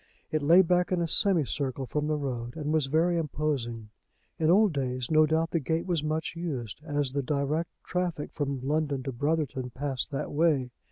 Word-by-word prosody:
It 155 Hz, -, 0 dB
lay 170 Hz, +6 st, +7 dB
back 180 Hz, +1 st, +2 dB
in 180 Hz, -, +2 dB
a 170 Hz, -, 0 dB
semi 175 Hz, -2 st, +3 dB
circle 135 Hz, -1 st, -2 dB
from 150 Hz, +3 st, -2 dB
the 155 Hz, 0 st, 0 dB
road, 120 Hz, -4 st, -4 dB
and 155 Hz, -1 st, -2 dB
was 155 Hz, -4 st, +2 dB
very 165 Hz, +4 st, +2 dB
imposing. 135 Hz, -8 st, -2 dB, 0.5 s
In 160 Hz, -1 st, +2 dB
old 200 Hz, +1 st, +5 dB
days 130 Hz, -2 st, -2 dB
no 155 Hz, 0 st, +5 dB
doubt 160 Hz, +1 st, +1 dB
the 165 Hz, -, +1 dB
gate 160 Hz, +3 st, -1 dB
was 170 Hz, -5 st, 0 dB
much 155 Hz, +1 st, -2 dB
used, 145 Hz, -, -4 dB
as 145 Hz, -4 st, -1 dB
the 140 Hz, +1 st, -1 dB
direct 150 Hz, +3 st, -1 dB
traffic 180 Hz, -4 st, -2 dB
from 140 Hz, -3 st, -2 dB
London 145 Hz, -3 st, 0 dB
to 135 Hz, -, -3 dB
Brotherton 140 Hz, -1 st, -1 dB
passed 135 Hz, +1 st, -3 dB
that 140 Hz, -, -4 dB
way. 145 Hz, -5 st, +2 dB
150 Hz, 190 wpm, -28 LUFS, 135-165 Hz, 0.5 s, lay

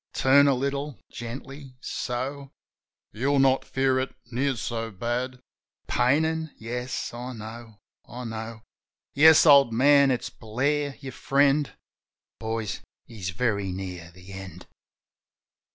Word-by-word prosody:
Turn 140 Hz, +2 st, +5 dB
a 140 Hz, -, +4 dB
little 140 Hz, +1 st, -3 dB
— -, -, -42 dB
gently 130 Hz, +3 st, -8 dB
— -, -, -41 dB, 0.2 s
so. 135 Hz, +3 st, -4 dB, 0.6 s
You'll 140 Hz, +6 st, 0 dB
not 135 Hz, -1 st, +4 dB
feel 130 Hz, -1 st, +1 dB
it 130 Hz, -, -4 dB, 0.2 s
near 135 Hz, +3 st, 0 dB
so 115 Hz, +1 st, -3 dB
bad.... 120 Hz, +5 st, -3 dB, 0.5 s
Painin'? 160 Hz, +5 st, +1 dB
Yes, 125 Hz, +3 st, -4 dB
I 125 Hz, +2 st, -6 dB
know, 110 Hz, 0 st, -9 dB, 0.3 s
I 125 Hz, +2 st, -7 dB
know. 110 Hz, -1 st, -6 dB, 0.5 s
Yes, 160 Hz, +3 st, +7 dB
old 140 Hz, -5 st, +7 dB
man; 140 Hz, +4 st, +5 dB
it's 125 Hz, -2 st, -1 dB
Blair, 140 Hz, +6 st, -1 dB
your 135 Hz, -2 st, -6 dB
friend... 140 Hz, +2 st, +2 dB, 0.7 s
(Boys, 110 Hz, -3 st, -3 dB, 0.3 s
he's 105 Hz, -6 st, -6 dB
very 100 Hz, -1 st, -1 dB
near 90 Hz, -2 st, -6 dB
the 90 Hz, +2 st, -14 dB
end.") 95 Hz, -1 st, -9 dB
125 Hz, 125 wpm, -26 LUFS, 110-140 Hz, 0.7 s, Yes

